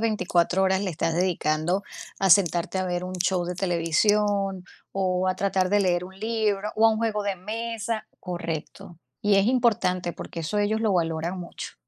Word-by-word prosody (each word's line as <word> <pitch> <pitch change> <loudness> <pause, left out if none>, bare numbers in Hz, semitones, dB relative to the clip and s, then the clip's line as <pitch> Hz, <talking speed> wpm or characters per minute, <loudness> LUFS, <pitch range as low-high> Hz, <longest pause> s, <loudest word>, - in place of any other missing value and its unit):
24 190 -4 +1
horas 190 0 +2
le 190 - -1
estás 165 +1 -1
dedicando 175 0 0 0.4
a 195 -2 +3
sentarte 175 -1 +3
a 185 - -1
ver 175 0 -2
un 185 0 -5
show 180 0 0
de 180 +1 -4
televisión, 195 +2 +1 0.3
o 185 -1 0
a 185 - 0
tratar 190 -1 +1
de 205 0 +4
leer 180 -2 +1
un 190 +1 -12
libro, 215 -2 0
o 225 +1 +6
a - - +5
un 220 - -1
juego 215 -2 0
de 200 -2 -1
mesa? 225 +3 -4
Correcto. 170 -1 -6 0.2
Y 205 -1 +4
es 195 +2 +4
importante 210 -8 +1
porque 170 - -7
eso 165 +6 -2
ellos 215 +2 +1
lo 215 -3 +2
valoran 165 +1 -1
mucho. 170 - -8
190 Hz, 180 wpm, -25 LUFS, 175-210 Hz, 0.4 s, o